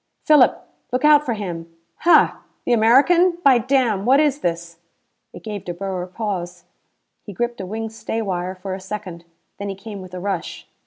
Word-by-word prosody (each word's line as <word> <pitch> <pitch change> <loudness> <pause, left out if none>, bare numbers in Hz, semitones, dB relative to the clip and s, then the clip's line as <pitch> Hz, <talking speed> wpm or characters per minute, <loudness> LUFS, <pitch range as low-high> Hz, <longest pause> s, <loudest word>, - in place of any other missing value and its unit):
"Philip, 295 -5 +4 0.2
look 255 +3 0
out 300 -1 +6
for 240 -5 -2
him!" 170 -5 -6 0.3
"Hah! 345 - +4 0.3
The 245 - +2
American. 290 +11 +4
By 260 -3 +6
damn, 240 -5 +1
what 260 +5 +4
is 295 -2 +2
this?" 170 - -4 0.5
It - - -12
gave 210 -3 -6
De 175 - -6
Boer 185 -1 -4
pause. 180 -4 -5 0.6
He 205 - -10
gripped 240 +2 -3
a 190 - -6
wing 220 +2 -5
stay 225 0 -4
wire 185 -3 -3
for 190 +1 -6
a 190 - -5
second. 185 -4 -7 0.3
Then 200 0 -4
he 195 - -4
came 200 0 -9
with 185 -1 -10
a - - -5
rush. 190 -2 -4
205 Hz, 180 wpm, -21 LUFS, 185-245 Hz, 0.6 s, out